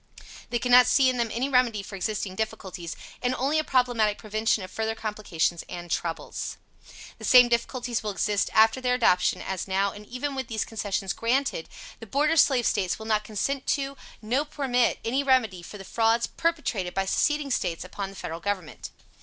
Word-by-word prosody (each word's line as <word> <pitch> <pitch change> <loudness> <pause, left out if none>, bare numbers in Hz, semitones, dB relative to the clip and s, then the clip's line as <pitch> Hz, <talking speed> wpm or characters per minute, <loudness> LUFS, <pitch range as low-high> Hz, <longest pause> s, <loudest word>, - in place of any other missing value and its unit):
They 240 - 0
could 245 +1 -2
not 250 0 +8
see 260 0 +4
in 250 - -4
them 235 -1 0
any 250 +4 -1
remedy 250 -6 +2
for 195 - -8
existing 200 0 -2
difficulties, 190 -5 -4 0.3
and 250 0 0
only 280 +5 +1
a - - 0
problematical 245 -6 +1
prevention 215 -1 0
of 185 - -9
further 220 0 -2
complications 205 -6 -2
and 175 -1 -7
troubles. 165 0 -3 0.6
The - - -11
same 250 -2 +7
difficulties 240 0 -1
will 215 - -3
exist 205 0 0
after 225 +3 +4
their 250 -1 +2
adoption 180 -7 +2
as 190 0 -4
now 195 +1 +1
and 205 0 -12
even 265 +4 -4
with 265 -2 -4
these 220 -2 -2
concessions 200 -3 -2
granted, 245 -6 -1 0.3
the 225 - -10
Border 300 +8 +2
Slave 265 -6 +4
States 185 -4 +1
will 220 - -9
not 215 -1 +1
consent 260 +6 -2
to, 275 0 -4 0.3
no 250 +7 +1
permit, 270 -5 0
any 255 +5 +1
remedy 250 -9 +2
for 190 +4 -10
the 195 - -10
frauds 230 +2 +2
perpetrated 285 - -2
by 195 - +1
seceding 295 +7 +1
States 165 -9 -1
upon 195 +1 -5
the 195 - -12
Federal 165 -3 -6
Government. 185 -3 -4
225 Hz, 185 wpm, -26 LUFS, 195-255 Hz, 0.6 s, not